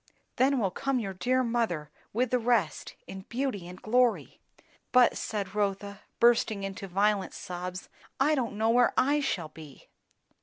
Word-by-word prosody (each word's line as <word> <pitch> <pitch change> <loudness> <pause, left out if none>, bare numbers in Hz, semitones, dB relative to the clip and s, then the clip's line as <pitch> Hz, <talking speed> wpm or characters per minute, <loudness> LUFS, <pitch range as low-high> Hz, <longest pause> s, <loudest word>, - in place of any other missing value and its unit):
Then 265 +2 +3
will 200 -6 0
come 275 +7 -1
your 200 -5 -3
dear 255 +8 +1
mother, 225 -11 -1 0.2
with 245 +2 0
the 250 - +3
rest, 235 -1 0
in 190 - -8
beauty 240 -8 -2
and 180 +1 -10
glory." 245 +1 +1 0.5
"But," 250 -1 +5
said 200 -3 -4
Rotha, 200 -1 -2 0.2
bursting 230 -4 +3
out - - -2
into 195 0 -8
violent 200 +2 +1
sobs, 180 +1 -6 0.3
"I 290 +3 +4
don't 240 -7 -1
know 220 +1 +2
where 245 +1 +3
I 290 +3 +3
shall 175 - -2
be!" 155 -3 -14
215 Hz, 160 wpm, -29 LUFS, 190-245 Hz, 0.5 s, But